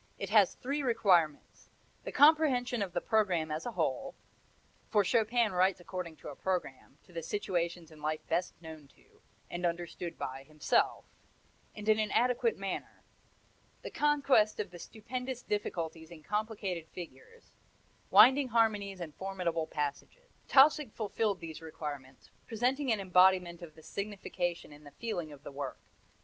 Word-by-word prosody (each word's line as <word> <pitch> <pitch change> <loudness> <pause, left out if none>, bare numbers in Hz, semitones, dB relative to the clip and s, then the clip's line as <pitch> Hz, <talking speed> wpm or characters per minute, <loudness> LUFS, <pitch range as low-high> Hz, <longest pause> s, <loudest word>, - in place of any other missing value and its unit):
It 195 0 -5
has 210 -4 +5
three 280 +3 -3
requirements: 190 - +1 0.4
The - - -4
comprehension 275 -6 +4
of 195 -3 -2
the 175 - -1
programme 180 -8 +1
as 155 +8 -3
a 240 - -4
whole, - - -2 0.7
for 210 -2 +3
Chopin 230 +1 +2
writes 185 +1 +2
according 175 -2 -6
to - - -10
a 145 - -8
programme, 170 -7 -4
to 180 - -20
the 165 - -4
situations 170 -2 -2
in 155 -1 -15
life 155 +1 -2
best 170 +1 -1
known 160 -3 -10
to, - - -26 0.3
and 175 +1 -4
understood 170 0 -3
by 130 +1 -5
himself; 150 +2 0 0.7
and 210 0 -8
in 215 0 +4
an 215 -1 0
adequate 250 - +2
manner; - - -5 0.8
the - - -6
conquest 280 -7 +3
of 205 -3 -3
the 175 - -10
stupendous 250 +6 -6
difficulties 165 -6 -3
in 165 -3 -12
complicated 205 -4 -3
figures, 455 - -12 0.6
winding 265 +1 +7
harmonies 210 -5 +1
and 160 -3 -6
formidable 180 -4 -2
passages. 150 - -5 0.2
Tausig 285 -2 +6
fulfilled 210 -2 -1
these 160 -1 -7
requirements, 145 -4 -8 0.2
presenting 250 +4 0
an 220 - +1
embodiment 180 -2 +4
of 165 -3 -10
the 160 - -15
signification 185 -5 -4
and 145 +1 -15
the 145 - -11
feeling 175 -9 -4
of 145 -1 -13
the - - -8
work. 140 -1 -5
190 Hz, 150 wpm, -32 LUFS, 165-225 Hz, 0.8 s, winding